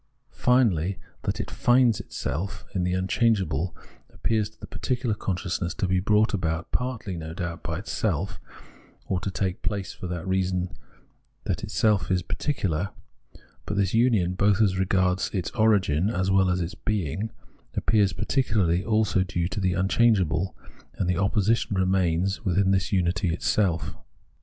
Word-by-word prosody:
Finally 100 -8 +2 0.2
that - - -2
it - - -4
finds 120 -3 +3
itself 80 +9 -4
in 95 -3 0
the 90 0 0
unchangeable 95 - +1 0.3
appears 110 -2 0
to 110 0 -29
the - - -7
particular 125 -3 -2
consciousness 90 -3 -2
to 95 - -1
be 95 0 +2
brought 105 +4 +3
about 85 -3 -2
partly, 125 -7 -2
no 80 -1 -6
doubt, 85 -2 -4
by 80 +1 -3
itself, 95 -3 -2 0.7
or 95 - -1
to 100 - -3
take 95 -1 -2
place 100 -2 -3
for 90 - -7
the 85 -1 -4
reason 90 -2 -1 0.7
that - - -1
itsel 105 -5 +1
is 90 -2 +1
particular; 95 - -1 0.8
but - - -2
this 100 -2 +1
union, 110 -7 +3
both 100 +2 +2
as 100 -4 +3
regards 95 -1 +1
its 90 -4 -2
origin 100 -6 +3
as 95 -2 0
well 95 -1 +4
as 90 - +1
in 90 - -1
its 85 - -7
being, 105 0 -2 0.5
appears 105 -4 +3
partly 95 - +1
also 105 -3 +2
due 85 -2 -1
to 95 +3 -4
the 95 -2 +1
unchangeable; 95 -3 +2 0.4
and 90 - -1
the 90 - +2
opposition 105 +1 +1
remains 95 +1 +1
within 95 -1 +2
this 95 -2 +1
unity 90 -1 +1
itself. 85 +1 0
95 Hz, 150 wpm, -26 LUFS, 90-105 Hz, 0.8 s, well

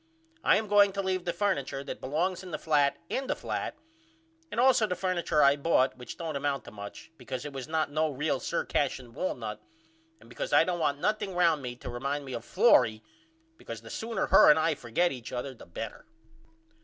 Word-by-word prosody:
I - - +5
am 220 - -2
going 205 -1 +5
to 200 - -1
leave 185 -1 -1
the 175 - 0
furniture 140 -9 -1
that - - -7
belongs 170 +7 -1
in 185 - -9
the 155 - -3
flat 145 -3 +2
in 265 0 -2
the - - 0
flat - - -4 0.7
and - - -3
allso 245 -4 +4
the 180 - 0
furniture 175 -5 +1
I 140 0 +6
bought 140 -3 +2
which 125 -1 -9
don't 165 -3 -4
amount 140 0 -1
to - - -10
much 100 +8 -10
because 130 +2 -5
it 145 - -6
was 135 0 -6
not 155 -2 0
no 155 +1 +1
real 145 0 -1
Sir - - -2
Cashion 130 -4 -1
walnut 115 -9 -4 0.6
and - - -18
besides 120 - -5
I - - +7
don't 175 0 -2
want 145 -3 0
nothing 205 0 -1
round 165 -4 +3
me 125 -2 -5
to 125 - -11
remind 140 +4 -3
me 130 - -7
of 120 - -5
Florrie 110 -1 +4 0.5
because 115 -1 -8
the 115 - -10
sooner 225 0 -2
her - - +7
and 150 - +7
I 160 0 +2
forget 145 +7 0
each 120 -4 -7
other 130 +2 -4
the 125 - -15
better. 85 - -7
150 Hz, 210 wpm, -29 LUFS, 130-180 Hz, 0.7 s, I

